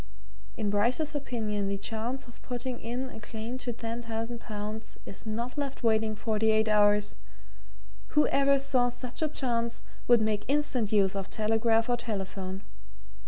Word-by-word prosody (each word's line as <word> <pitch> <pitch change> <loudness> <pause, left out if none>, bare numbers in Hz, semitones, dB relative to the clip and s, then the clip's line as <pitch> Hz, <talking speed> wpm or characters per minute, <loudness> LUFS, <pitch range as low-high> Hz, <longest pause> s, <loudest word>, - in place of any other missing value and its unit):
In 205 -2 0
Bryce's 250 +9 +2
opinion 220 -8 -1
the 200 0 -1
chance 225 +6 -3
of 240 0 -15
putting 245 0 -4
in 250 +3 -3
a - - -8
claim 225 +3 -5
to 245 - -2
ten 230 0 -4
thousand 230 +1 -4
pounds 215 0 -6
is 200 - -7
not 235 +5 -2
left 275 -2 -3
waiting 220 -1 +3
forty 220 0 +1
eight 220 0 +4
hours 210 -1 +4 1.0
whoever 275 - +5
saw 265 -3 +2
such 245 +2 -4
a 310 - +3
chance 235 -4 0 0.2
would 240 -1 +7
make 215 -1 +1
instant 275 -6 +1
use 200 -2 +4
of 195 -1 -3
telegraph 225 +1 +2
or 245 -1 +2
telephone. 195 -4 -4
225 Hz, 155 wpm, -29 LUFS, 210-245 Hz, 1.0 s, would